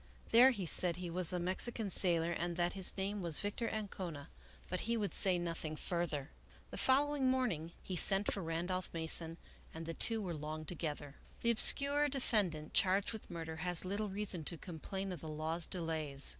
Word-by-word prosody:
There 245 +3 +7
he 205 -8 -3
said 170 +1 +1
he 175 -1 -6
was 180 0 0
a 180 - -2
Mexican 195 +4 -1
sailor 170 -3 +2
and 170 0 -3
that 175 0 -1
his 190 -1 -4
name 200 +1 -3
was 170 -4 0
Victor 205 +3 -3
Ancona; 185 -8 -6 0.4
but 185 - -3
he 235 - +1
would 205 -3 -3
say 185 -2 +2
nothing 165 -2 -5
further. 160 -4 -4 0.4
The - - -7
following 275 0 +2
morning 200 -11 -2
he 185 - -5
sent 195 +3 +4
for 200 - -4
Randolph 175 +2 -3
Mason 165 0 0 0.4
and 160 0 -7
the 165 - -5
two 225 +6 +4
were 185 -5 -4
long 155 0 -6
together. 150 -3 -5
IV 140 - -23
The 235 - +3
obscure 280 +5 +8
defendant 205 - -1
charged 195 +3 +2
with 220 - -10
murder 165 -2 -7
has 175 +1 -2
little 205 +3 -3
reason 195 -4 -4
to 170 - -3
complain 190 +4 -7
of 180 - -7
the 160 - -8
law's 160 +2 -4
delays. 160 -5 0
180 Hz, 185 wpm, -34 LUFS, 165-205 Hz, 0.4 s, obscure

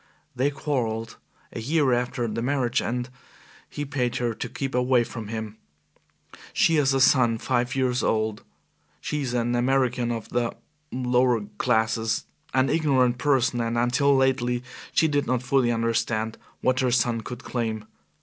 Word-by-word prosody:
They 130 +3 +2
quarrelled 120 -6 -2 0.4
a - - -4
year 140 +2 +2
after 120 0 -1
the 115 +1 -3
marriage, 130 0 +1
and 120 +1 -2 0.6
he 145 - -4
paid 130 -4 -1
her 120 -2 0
to - - -5
keep 135 -1 -4
away 125 0 +3
from 115 -2 -7
him. 110 -1 -5 1.0
She 165 - +3
has 135 -2 +3
a - - +2
son 125 -3 +4
five 120 +3 -1
years 130 -2 +1
old. 110 -1 0 0.6
She 150 - -3
is 125 -3 -2
an 120 0 0
American 125 -1 +1
of 115 -2 -5
the 120 -1 -1 0.4
lower 125 -2 +2 0.2
classes, 110 0 +1 0.3
an 130 0 +2
ignorant 130 -5 +2
person, 130 -4 +2
and 115 0 -1
until 130 +4 +3
lately 125 -2 +1 0.3
she 160 - +3
did 145 -2 0
not 125 0 0
fully 125 -1 +2
understand 115 -1 -1 0.2
what 130 0 +2
her 130 -2 +2
son 120 -1 +1
could 125 +4 -8
claim. 110 -3 -3
125 Hz, 155 wpm, -25 LUFS, 115-130 Hz, 1.0 s, son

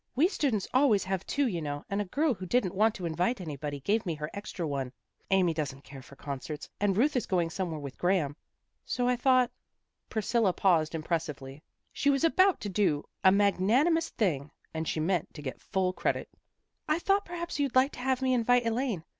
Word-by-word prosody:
We 300 +7 +5
students 260 - -1
always 255 -7 +4
have 190 0 -3
two, 285 0 +1
you 180 -9 -1
know, 145 -1 -4
and 200 +1 -1
a - - -2
girl 285 - +1
who 185 -3 -7
didn't 205 -4 +1
want 215 +3 +3
to 185 - -5
invite 175 +9 0
anybody 145 -4 -5
gave 210 +9 +1
me 170 -4 -2
her 150 +1 -5
extra 200 -4 -5
one. 135 -3 -3 0.4
Amy 185 -3 +3
doesn't 140 -3 -4
care 135 -1 -11
for 140 - -15
concerts, 140 +2 -6
and 200 -2 +1
Ruth 280 +6 +3
is 250 - 0
going 175 -3 +1
somewhere 170 -3 -3
with 140 -2 -8
Graham. 175 -6 +1 0.5
So 245 -1 -1
I 250 - +3
thought 255 0 +3 0.3
" - - -53
Priscilla 220 -2 +1
paused 165 -5 +2
impressively. 155 -4 -3 0.3
She 285 - +1
was 275 +2 +2
about 370 +3 +4
to 205 - -3
do 180 -7 +1 0.2
an 190 +1 +6
magnanimous 240 - +3
thing, 155 - -1 0.2
and 160 0 -3
she - - -1
meant 170 +1 -1
to 150 - -7
get 130 - -6
full 185 -1 0
credit. - - -1 0.3
" - - -53
I 310 +1 +2
thought 395 +3 +2
perhaps 345 -3 -5
you'd 280 -3 0
like 260 +2 +5
to - - -10
have 260 0 0
me 260 0 +2
invite 245 0 +3
Elaine. 230 -6 -1
195 Hz, 205 wpm, -29 LUFS, 160-250 Hz, 0.5 s, an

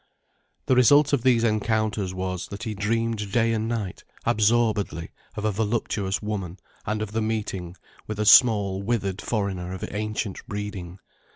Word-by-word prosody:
The - - +3
result 145 +4 +5
of 140 - +3
these 120 -2 +3
encounters 110 -3 0
was, 95 -1 -4
that 100 +3 -7
he 110 -2 -3
dreamed 105 0 -1
day 115 0 +2
and 110 0 -1
night, 110 -6 -3 0.2
absorbedly, 110 -6 +1 0.2
of 105 - -3
a 110 - +2
voluptuous 105 -2 -1
woman 100 -4 -4 0.3
and 105 +1 -1
of 105 - -6
the 110 +1 -1
meeting 100 -5 -3 0.3
with 110 -1 -5
a 105 - +1
small, 100 -4 +6
withered 100 -2 -1
foreigner 95 -5 -2
of 95 - -5
ancient 105 -1 -3
breeding. 100 -5 -5
105 Hz, 155 wpm, -25 LUFS, 100-115 Hz, 0.3 s, small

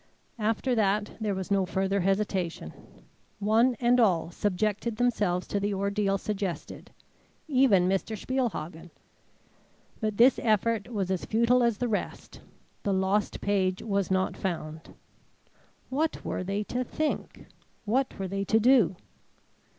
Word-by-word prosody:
After 225 +4 0
that 210 -2 +1
there 210 -2 0
was 190 +1 -5
no 195 -1 +3
further 190 +2 0
hesitation. 190 - -1 0.6
One 225 +5 +3
and 245 +1 +3
all 180 -7 +2
subjected 210 +4 -1
themselves 210 -7 +1
to 200 - 0
the 200 0 -1
ordeal 200 0 0
suggested; 195 -3 -5 0.6
even 255 - +4
Mr. 195 +3 -1
Spielhagen. 190 -10 -3 1.1
But 215 -2 -2
this 245 +2 +6
effort 220 0 +1
was 195 -4 -2
as 185 - -2
futile 235 +3 +3
as 235 -3 +2
the 245 - -1
rest. 215 -3 -4 0.4
The 200 - 0
lost 190 +2 0
page 190 -2 0
was 200 -3 -1
not 190 0 0
found. 160 -4 -5 0.9
What 305 +4 -1
were - - -2
they 200 +3 -2
to 250 +4 -2
think? 310 +4 -3 0.4
What 255 +5 0
were 195 -2 -3
they 195 +1 -2
to 220 +3 +2
do? 225 -7 +4
205 Hz, 135 wpm, -28 LUFS, 190-230 Hz, 1.1 s, this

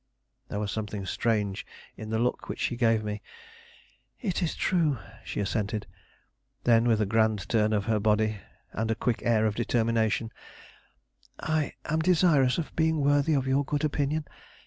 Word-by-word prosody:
There 105 - -3
was 105 -1 -2
something 105 -2 -4
strange 105 -2 0 0.3
in 110 - -8
the 110 - 0
look 120 +2 -1
which - - -4
she 120 - 0
gave 115 -2 +2
me. 105 0 -4 1.0
"It 195 -6 -2
is 170 - -1
true," 160 -7 +1 0.3
she - - -5
assented. 105 +1 -1 0.8
Then, 115 0 +4
with 110 -2 +3
a - - +3
grand 110 -3 +1
turn 110 -1 +2
of 105 -2 0
her 110 -1 +1
body, 105 0 +1 0.3
and 110 +1 -2
a 115 - +1
quick 120 0 -1
air 110 -2 +3
of 110 - +1
determination: 115 -1 0 1.1
"I 155 -2 -1
am 160 +1 0
desirous 160 -6 +4
of 165 - -4
being 160 -1 +2
worthy 145 +2 +3
of 135 -2 +1
your 135 +2 +2
good 145 +2 -2
opinion. 150 +1 0
115 Hz, 165 wpm, -28 LUFS, 110-145 Hz, 1.1 s, Then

